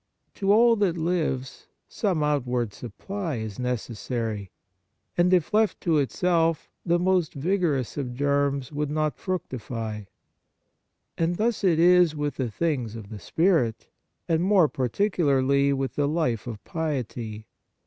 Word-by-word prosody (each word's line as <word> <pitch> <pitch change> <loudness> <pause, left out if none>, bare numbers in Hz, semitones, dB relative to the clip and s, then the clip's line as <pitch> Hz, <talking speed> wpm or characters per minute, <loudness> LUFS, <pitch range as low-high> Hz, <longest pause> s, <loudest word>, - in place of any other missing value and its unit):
To 195 0 +1
all 230 +2 +6
that 190 -5 +1
lives 160 -6 -2 0.2
some 185 -8 -1
out 150 -3 +1
ward 120 -4 -1
supply 165 - -5
is 110 -2 -5
necessary; 115 -4 -3 0.7
and 175 +1 +3
if 180 +2 +2
left 215 0 +2
to 165 -4 +2
itself, 165 +2 +1
the 170 -1 +2
most 180 -3 +1
vigorous 155 - 0
of 125 -4 -3
germs 140 -1 0
would 150 0 -2
not 155 0 -1
fructify. 115 - -4 1.1
And 170 +1 +1
thus 225 0 0
is 175 -1 +5
it - - -9
with 145 0 -2
the 130 -3 -1
things 125 -4 -2
of 110 -3 -9
the 110 -2 -8
spirit, 160 - +1 0.4
and 165 0 +2
more 190 -3 +4
particularly 140 - +1
with 135 -1 -1
the 145 -1 +1
life 145 -8 -1
of 110 -3 -7
piety. 120 -9 -4
150 Hz, 140 wpm, -26 LUFS, 125-175 Hz, 1.1 s, all